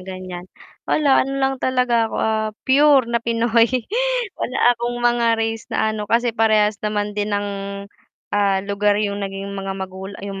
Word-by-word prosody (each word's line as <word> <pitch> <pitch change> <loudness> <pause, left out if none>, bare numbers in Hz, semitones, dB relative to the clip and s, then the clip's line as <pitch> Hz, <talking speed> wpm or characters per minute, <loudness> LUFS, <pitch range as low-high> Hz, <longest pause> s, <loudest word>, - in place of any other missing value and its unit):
ganyan 185 -1 -8 0.4
wala 285 -3 +4
ano 270 - -4
lang 270 0 +1
talaga 250 -3 +1
ako, - - -5
ah, 220 0 0 0.2
pure 275 0 +5
na 235 0 0
Pinoy. 230 0 +2 0.7
Wala 255 - -2
akong 240 0 -3
mga 240 -1 +2
race 225 0 -2
na 220 - +1
ano, 215 -1 -4
kasi 235 +1 +2
parehas 215 -2 +3
naman 210 0 -1
din 205 0 -1
ng, 205 0 -2 0.8
ah, 200 -2 +2
lugar 205 +1 +1
yung 200 -1 -1
naging 195 0 -5
mga 195 -1 -4
magulang 190 +1 -7
yung 195 -1 -6
215 Hz, 160 wpm, -20 LUFS, 200-235 Hz, 0.8 s, pure